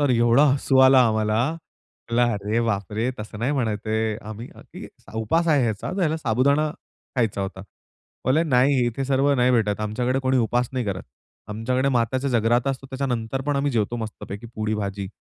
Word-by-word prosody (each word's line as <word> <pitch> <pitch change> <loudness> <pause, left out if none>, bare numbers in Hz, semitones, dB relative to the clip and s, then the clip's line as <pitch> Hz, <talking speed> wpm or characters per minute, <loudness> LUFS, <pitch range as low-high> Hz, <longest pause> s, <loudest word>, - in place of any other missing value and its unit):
तर 145 -2 +2
एवढा 120 +3 +4
हसू 135 -1 +1
आला 130 0 +6
आम्हाला. 110 0 +1 0.7
म्हणलं, 120 0 +2
"अरे 105 +3 -1
बापरे, 105 +3 -1
तसं 105 0 -8
नाही 125 +6 0
म्हणायचे 110 -6 -2
आहे. 110 -1 0
आम्ही 110 +3 -7
अ, - - -14
की - - -8 0.3
उपास 110 +10 0
आहे 145 -4 +4
ह्याचा, 110 -4 -2
ह्याला 160 -4 +1
साबुदाणा 140 +3 +1 0.5
खायचा 115 -5 0
होता." 95 -1 -6 0.7
बोलले, 145 +5 +3
"नाही, 130 -3 +3
इथे 120 +3 -2
सर्व 135 +1 +2
नाही 125 -1 +3
भेटत. 110 -4 +1
आमच्याकडे 120 +5 -1
कोणी 130 0 +1
उपास 120 +1 +1
नाही 130 -2 -2
करत. 95 -2 -3 0.5
आमच्याकडे 125 +5 -1
मात्याच्या 130 +2 0
जगराता 120 +2 +2
असतो. 135 0 -6
त्याच्यानंतर 130 -2 -2
पण 145 -1 +1
आम्ही 140 +1 +1
जेवतो 115 0 0
मस्तपैकी 110 -1 -7
पुरी-भाजी." 105 -2 -3
120 Hz, 170 wpm, -23 LUFS, 110-135 Hz, 0.7 s, आला